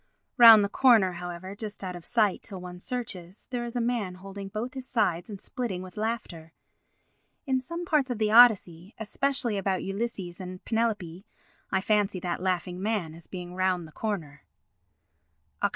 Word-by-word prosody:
Round 225 -4 +10
the - - +1
corner, 220 -4 +4
however, 175 +2 -7
just 210 -1 -6
out 180 -1 -4
of 175 - -10
sight 215 -5 +1
till 195 -4 -7
one 180 0 -9
searches, 195 -6 -5
there 245 -1 -2
is 240 +1 -6
a - - +1
man 230 -6 -1
holding 195 +1 -8
both 220 +6 -5
his 260 -1 -7
sides 195 -8 0
and 200 -2 -7
splitting 195 -7 -4
with 185 +1 -11
laughter. 210 -8 -4 0.9
In 260 -2 +1
some 335 +6 -6
parts 300 -6 +2
of 245 - -2
the 215 -1 +1
Odyssey, 205 -6 +5
especially 235 0 0
about 190 -1 -1
Ulysses 195 -3 -4
and 185 0 -8
Penelope, 210 -5 -2 0.4
I 190 - +2
fancy 205 -2 +1
that 175 0 -3
laughing 180 -1 -2
man 200 -6 -1
as 165 0 -13
being 180 -1 -7
round 185 -2 0
the - - -15
corner. 160 -9 -4 1.2
[Oct. - - +3
200 Hz, 170 wpm, -27 LUFS, 180-230 Hz, 1.2 s, Round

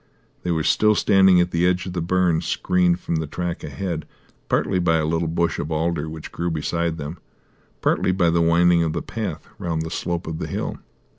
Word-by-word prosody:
They 90 - -4
were 80 -2 +1
still 105 +5 +3
standing 95 -3 +5
at 90 0 +1
the 85 +1 +1
edge 90 0 +1
of 90 - -5
the 90 - -2
burn, 90 -1 +2
screened 90 -1 +1
from 85 - -2
the 80 -1 -2
track 90 +2 -4
ahead, 85 -5 -4 0.4
partly 95 - +1
by 80 -2 +3
a 80 - 0
little 80 +1 0
bush 85 0 0
of 75 - -4
alder 80 0 -1
which 80 -1 -8
grew 85 +1 -2
beside 85 +1 -1
them, 75 +3 -6 0.6
partly - - +2
by 90 -2 +2
the 85 0 +2
winding 85 +1 +4
of 80 -2 0
the - - -3
path - - -5
round 80 -2 -2
the 80 - -6
slope 85 +1 -3
of 80 -1 -5
the - - -3
hill. - - -4
85 Hz, 210 wpm, -22 LUFS, 80-90 Hz, 0.6 s, standing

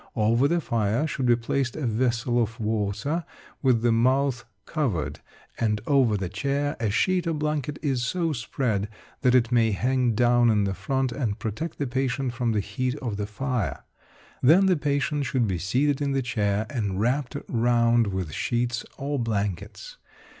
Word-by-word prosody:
Over 115 +4 +3
the 170 +2 +1
fire 115 +2 0
should 135 -4 -2
be 120 - +6
placed 120 +2 -2
a 155 - -3
vessel 120 +1 +1
of 115 +1 -3
water 110 - -1 0.4
with 125 -4 +3
the 120 - +4
mouth 130 +2 +2 0.2
covered; 120 - -2 0.4
and 105 -2 +1
over 130 -7 +3
the 95 -2 -3
chair 140 +8 -1
a 110 - 0
sheet 180 - +1
or 165 - 0
blanket 150 -1 -2
is 135 -5 0
so 165 +4 0
spread 115 -5 -2 0.3
that 125 0 +4
it 120 -1 +3
may 115 -2 +4
hang 125 +2 +1
down 120 0 +4
in 105 -2 +3
the 100 -1 0
front 130 +7 -1
and 115 -6 -2
protect 120 +11 -4
the 145 - -1
patient 130 0 -1
from 120 -1 0
the 105 -2 +1
heat 130 +5 -2
of 120 -8 -4
the 105 0 -3
fire. 105 - -2 0.6
Then 165 +9 +6
the 185 -1 +4
patient 145 -1 0
should 125 -3 +1
be 95 -4 -1
seated 135 +10 +1
in 140 -1 0
the 135 -1 0
chair 105 -3 0
and 105 -7 -2
wrapped 125 +4 0
round 120 -1 +3
with 95 -5 -3
sheets 120 - -1
or 140 0 -2
blankets. 110 - -3
120 Hz, 175 wpm, -25 LUFS, 110-140 Hz, 0.6 s, be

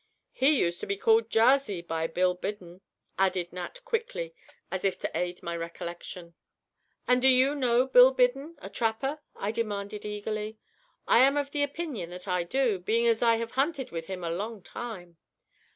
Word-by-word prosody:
"He 275 +3 +3
used 170 -5 0
to - - -6
be 200 - -1
called 225 +2 +3
'Jarsey' 225 -6 +3
by 165 -1 -2
Bill 180 +2 +1
Biddon," 180 -1 -7 0.4
added 185 -2 +1
Nat, 185 - -7
quickly, 455 - -3 0.4
as 190 0 -3
if 195 -1 +1
to - - -4
aid 180 0 -2
my 170 0 -3
recollection. 170 +1 -7 0.7
"And 250 0 +4
do 265 - +5
you 260 +2 +5
know 250 -3 +2
Bill 260 0 +7
Biddon, 270 +5 +1
a 195 - -9
trapper?" 245 +6 -1 0.2
I 200 - -2
demanded, 210 -2 -3
eagerly. 210 +1 -4 0.5
"I - - +6
am 275 +3 +5
of 285 -1 -1
the 290 - -1
opinion 285 - -3
that 180 +2 -8
I 180 -1 +1
do, 225 +2 0
being 225 +6 +1
as 230 -1 +3
I 230 -1 +5
have 230 0 -4
hunted 270 0 -1
with 165 -1 -5
him 185 -2 -5
a 165 - -2
long 205 +3 -4
time." 180 -7 -8
220 Hz, 180 wpm, -28 LUFS, 180-255 Hz, 0.7 s, Bill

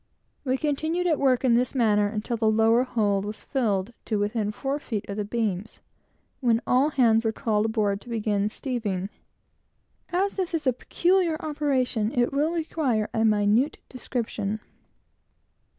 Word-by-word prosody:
We 260 -1 0
continued 315 +5 -1
at 320 -5 +2
work 260 -2 +2
in 245 - +4
this 245 +3 +1
manner 210 -4 +3
until 215 +3 -3
the 225 -1 +2
lower 225 +2 +4
hold 205 -6 0
was 210 +1 -6
filled 215 -5 -1
to 215 - 0
within 210 +1 -1
four 270 +7 -3
feet 220 -8 -4
of 200 - -4
the 210 - -2
beams, 210 -2 -3 0.6
when 235 -4 +2
all 260 +4 +3
hands 230 -6 +3
were 225 - +1
called 215 -1 0
aboard 210 -3 0
to 235 -2 -4
commence 210 -1 -1
steeving. 210 -8 -2 1.0
As 385 +4 0
this 360 -3 -1
is 315 - -3
a 255 - +3
peculiar 345 +5 +1
operation, 265 -7 0
it 240 +2 +2
will 295 +3 +2
require 305 -10 -1
a 220 - +1
minute 215 +6 +2
description. 220 -4 -3
230 Hz, 155 wpm, -26 LUFS, 210-275 Hz, 1.0 s, in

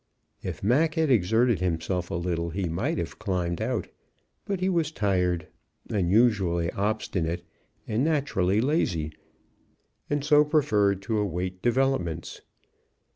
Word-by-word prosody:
If - - -6
Mac 150 +9 +3
had 160 -4 +2
exerted 115 +1 +3
himself 90 0 -1
a - - -3
little, 85 -1 -1
he 90 +2 -2
might 80 0 -1
have - - -4
climbed 90 -1 -2
out, 120 +1 -1 0.6
but 195 -2 -2
he 185 - 0
was 170 -5 +1
tired, 90 - 0 0.5
unusually 95 -4 +2
obstinate, 90 -5 -2 0.4
and 110 +4 0
naturally 135 - +1
lazy, 85 - 0 1.0
and 145 -1 0
so 150 0 +6
preferred 105 - +2
to 110 +1 0
await 90 -2 -3
developments. 120 - 0
100 Hz, 125 wpm, -26 LUFS, 90-135 Hz, 1.0 s, so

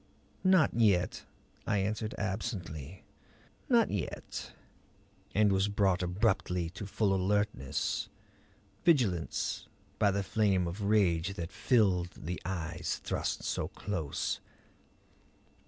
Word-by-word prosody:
"Not 185 -4 +5
yet," 100 -6 +2 0.4
I 110 - +2
answered 105 +2 -1
absently. 95 - -4 0.7
"Not 235 -3 +4
yet." 100 -4 -4 0.8
And 105 0 +5
was 95 +1 +2
brought 100 -3 +2
abruptly 90 -2 0
to 100 +2 -7
full 100 0 +1
alertness, 95 -7 0 0.7
vigilance, 115 - +1 0.3
by 105 - +5
the 100 0 0
flame 100 -3 +2
of 85 +5 -4
rage 95 -3 +3
that 85 0 -5
filled 95 -6 +2
the 90 +2 -5
eyes 85 -3 -3
thrust - - -2
so - - -1
close. 90 -8 -3
95 Hz, 105 wpm, -31 LUFS, 90-105 Hz, 0.8 s, Not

